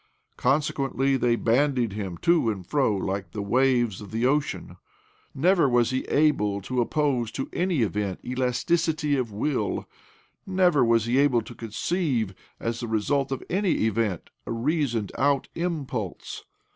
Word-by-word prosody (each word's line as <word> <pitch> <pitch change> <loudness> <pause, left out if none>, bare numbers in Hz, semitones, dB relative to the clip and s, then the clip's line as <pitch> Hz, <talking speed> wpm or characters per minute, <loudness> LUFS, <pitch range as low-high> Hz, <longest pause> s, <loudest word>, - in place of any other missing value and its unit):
Consequently 135 -1 +1
they 120 -2 +2
bandied 120 -1 +1
him 95 -4 -5
to 170 -9 +3
and 95 -4 -4
fro 130 -3 +1
like 95 -2 -3
the 105 - -3
waves 120 -2 +2
of 105 - -9
the 115 +2 -1
ocean. 145 +3 -1 0.6
Never 170 0 +3
was 120 -1 +3
he 130 - -1
able 140 -10 +2
to 125 +5 -1
oppose 130 -3 0
to 135 - -3
any 175 -8 +1
event 100 -2 -2
elasticity 150 +5 0
of 125 -5 -2
will; 110 +1 -2 0.6
never 185 -6 +3
was 115 -1 +3
he 120 +3 +2
able 130 -5 +3
to - - -10
con 115 - -8
ceive, 125 - -1 0.3
as 115 0 -3
the 120 - -4
result 135 +6 0
of 135 - -3
any 190 - +1
event, 110 -5 -1 0.2
a - - -3
reasoned 120 - -1
out 140 0 +2
impulse. 140 - -4
125 Hz, 150 wpm, -26 LUFS, 110-145 Hz, 0.6 s, to